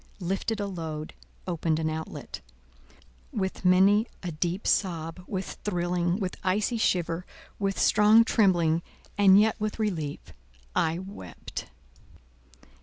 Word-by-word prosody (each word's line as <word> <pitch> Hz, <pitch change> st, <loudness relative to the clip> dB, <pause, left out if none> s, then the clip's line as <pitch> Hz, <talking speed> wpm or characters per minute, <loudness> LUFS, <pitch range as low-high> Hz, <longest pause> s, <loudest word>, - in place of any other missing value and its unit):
lifted 195 Hz, +4 st, -2 dB
a 205 Hz, -, -1 dB
load, 160 Hz, -5 st, -5 dB, 0.3 s
opened 165 Hz, -3 st, 0 dB
an 160 Hz, 0 st, -1 dB
outlet. 160 Hz, -, -5 dB, 0.9 s
With 190 Hz, -2 st, -3 dB
many 195 Hz, +5 st, +5 dB, 0.2 s
a 175 Hz, -, -3 dB
deep 175 Hz, +5 st, -2 dB
sob, 170 Hz, -2 st, 0 dB
with 190 Hz, -2 st, -5 dB
thrilling, 175 Hz, -1 st, 0 dB
with 185 Hz, -3 st, -3 dB
icy 205 Hz, +5 st, +1 dB
shiver, 175 Hz, -4 st, +1 dB, 0.4 s
with 195 Hz, -1 st, -1 dB
strong 210 Hz, +2 st, +6 dB
trembling, 175 Hz, -8 st, +3 dB, 0.3 s
and 200 Hz, -1 st, +7 dB
yet 220 Hz, +1 st, +3 dB
with 215 Hz, 0 st, -2 dB
relief—I 150 Hz, -, -3 dB
wept. 180 Hz, -, -8 dB
180 Hz, 110 wpm, -27 LUFS, 165-200 Hz, 0.9 s, and